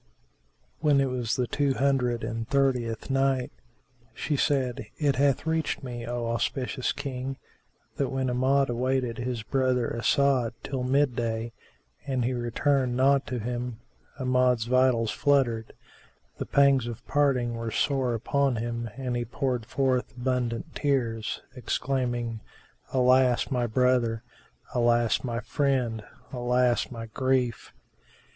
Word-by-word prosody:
When 150 -3 +3
it 135 -1 +1
was 120 -3 -1
the 125 - 0
Two 140 +1 0
Hundred 130 -4 +1
and 115 0 -4
Thirtieth 125 -4 0
Night, 135 -1 +1 0.6
She 150 - -1
said, 130 -6 0
It 140 -4 +1
hath 140 +1 +2
reached 160 -2 -1
me, 120 -2 -6
O 120 0 -2
auspicious 125 +2 -1
King, 135 -1 -4 0.6
that 140 - 0
when 135 -1 -1
Amjad 130 +2 +2
awaited 125 -1 -1
his 120 -2 -3
brother 130 -1 0
As'ad 125 -1 +2
till 135 -2 -3
mid 130 0 +2
day 115 -1 -2 0.5
and 130 -3 0
he 130 - 0
returned 125 +1 0
not 135 +1 +3
to 125 - -3
him, 120 0 -4 0.4
Amjad's 125 -3 +2
vitals 125 -2 +3
fluttered; 125 -6 +1 0.7
the - - -3
pangs 140 -3 +4
of 120 0 -7
parting 135 -5 +1
were 115 0 -4
sore 130 0 0
upon 135 +3 +1
him 115 +1 -3
and 130 -2 -2
he 120 - 0
poured 125 -1 -2
forth 130 -2 0
abundant 125 +2 -2
tears, 120 -6 -1
exclaiming, 120 -2 -2 0.5
"Alas, 130 0 +3
my 125 -2 +1
brother! 120 -1 +2 0.5
Alas, 120 -2 +2
my 120 -2 -2
friend! 125 -7 0 0.3
Alas 125 0 +1
my 115 -2 -6
grief! 125 0 -1
125 Hz, 130 wpm, -27 LUFS, 120-135 Hz, 0.7 s, pangs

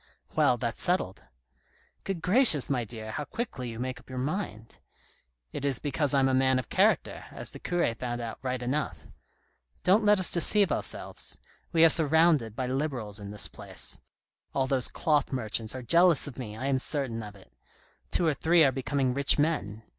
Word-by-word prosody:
" - - -31
Well, 125 - +3
that's 120 -2 -4
settled." 175 - -1 0.4
" - - -38
Good 185 -4 -4
gracious, 180 - +7
my 125 -3 0
dear, 110 -1 -8
how 150 - -4
quickly 145 - -6
you 115 - -8
make 130 +2 -5
up - - -22
your 130 - -7
mind! 130 - -5 0.3
" - - -35
" - - -47
It - - -6
is 140 -3 0
because 145 0 -1
I'm 135 -1 +3
a 135 - 0
man 130 0 +2
of 130 - -5
character, - - 0
as - - -8
the - - -11
cure 175 -9 -1
found 120 +1 -5
out 115 -1 -7
right 130 -1 -4
enough. 140 +4 -3 0.8
Don't 195 +5 +3
let 210 0 +4
us 185 - +5
deceive 190 +1 +5
ourselves; - - -2 0.3
we 165 -1 +5
are - - +6
surrounded 155 -7 +3
by 130 - -3
Liberals 125 -6 -4
in 100 -1 -9
this 105 0 -1
place. - - -8 0.5
All 135 - +1
those 130 -2 0
cloth 150 -3 0
merchants 115 -2 -3
are 130 - -7
jealous 170 +3 +4
of 145 -5 -8
me, 110 -4 -7
I 130 - -5
am 135 -1 0
certain 130 -5 -3
of 105 -1 -10
it; 95 -9 -19 0.6
two 175 - +1
or 160 - +2
three 165 +4 +3
are 135 - +4
be 135 - -5
coming 135 -1 -1
rich 140 +2 +4
men. 130 -9 -2
130 Hz, 200 wpm, -27 LUFS, 115-160 Hz, 0.8 s, gracious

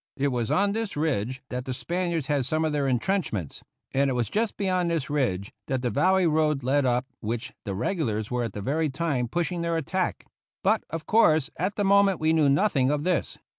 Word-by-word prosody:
It 140 +1 +1
was 120 -4 -1
on 200 +1 +2
this 220 -5 -3
ridge 130 -5 -1
that 125 0 -4
the 130 - -3
Spaniards 170 -1 -2
had 145 -1 +1
some 155 +2 +1
of 155 - -1
their 145 -2 +1
intrenchments, 125 - -1 0.3
and 135 0 +2
it - - 0
was 120 -3 -1
just 220 +1 -1
beyond 185 -3 +1
this 160 -5 -2
ridge 105 -10 -1
that 130 -1 -1
the 120 - 0
Valley 185 - +3
Road 155 -3 +2
led, 135 +1 +2
up 125 +1 +1
which 115 +2 -4
the 100 -3 -3
regulars 110 - -1
were 125 0 0
at 115 -4 -3
that 105 - -5
very 155 +6 0
time 140 -4 -1
pushing 175 +5 -2
their 170 0 0
attack; 180 +4 -2 0.4
but, 215 +3 +2
of 165 -1 -5
course, 160 -10 +4
at 185 +4 -2
the 205 - 0
moment 200 -2 +4
we 155 +1 +2
knew 155 -3 +4
nothing 140 -4 +3
of 145 0 0
this. 180 -2 -1
150 Hz, 210 wpm, -26 LUFS, 125-180 Hz, 0.4 s, course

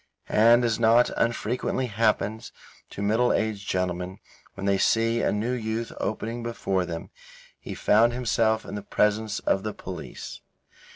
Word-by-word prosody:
And 120 +3 +5
as 115 -2 0
not 115 +1 +4
unfrequently 120 +2 -1
happens 110 0 0 0.4
to 100 - -6
middle 110 +4 +2
aged 105 -2 -1
gentlemen 90 0 -2 0.4
when 95 - -5
they 100 -1 +2
see 115 +2 +2
a - - +1
new 110 +4 -1
youth 115 -1 -3
opening 115 +2 -3
before 100 -6 -2
them, 85 -1 -6 0.5
he - - -7
found 115 +3 +4
himself 115 -2 +1
in - - -8
the 105 - -4
presence 105 +1 0
of 95 - +1
the 105 +1 -5
police. - - -8
110 Hz, 150 wpm, -26 LUFS, 100-115 Hz, 0.5 s, And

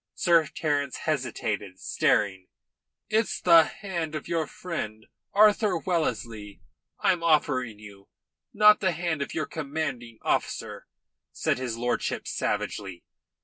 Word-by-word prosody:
Sir 170 -3 +4
Terence 145 -4 -1
hesitated, 110 -9 -2
staring. 95 -2 +1 0.6
"It's 220 +1 0
the 165 -2 +7
hand 170 -6 -5
of 155 - -5
your 165 -2 -1
friend, 165 - -6 0.3
Arthur 210 -2 +4
Wellesley, 115 - -3 0.4
I'm 180 -2 +2
offering 140 -8 +1
you, 100 -2 -14 0.4
not 210 0 +6
the 190 -3 +1
hand 165 -2 -2
of 140 - -4
your 155 - -1
commanding 140 -7 -4
officer," - - -2 0.4
said - - -1
his 125 -3 -3
lordship 120 +1 -2
savagely. 95 -4 -3
155 Hz, 115 wpm, -27 LUFS, 115-170 Hz, 0.6 s, the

